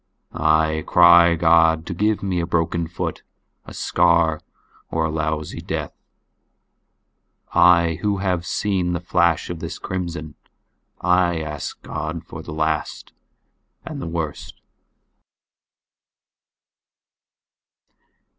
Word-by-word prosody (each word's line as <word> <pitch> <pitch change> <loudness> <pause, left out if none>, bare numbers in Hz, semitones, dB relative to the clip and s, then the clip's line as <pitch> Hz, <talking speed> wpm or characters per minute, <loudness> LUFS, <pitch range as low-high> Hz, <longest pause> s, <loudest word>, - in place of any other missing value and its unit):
I 80 0 +1
cry 85 -1 +6
God 80 -1 +3
to 90 - -4
give 105 +4 0
me 95 -3 -1
a 85 - -2
broken 85 -1 -1
foot, 85 - -5 0.4
a - - -11
scar, 85 -3 +2 0.5
or 80 -1 0
a 80 - -2
lousy 80 -1 -3 1.9
death.I 85 -2 +4
who 105 -1 0
have 90 -3 -1
seen 90 -1 -1
the 85 - -1
flash 85 -1 +1
of 85 - -6
this - - -6
crimson, 85 -5 -5 0.7
I 90 -1 +2
ask 75 -2 -6
God 80 +2 -5
for 80 - -9
the 80 - -9
last 80 0 -3 0.7
and 85 - -6
worst. 80 -3 -5
85 Hz, 100 wpm, -21 LUFS, 80-90 Hz, 1.9 s, cry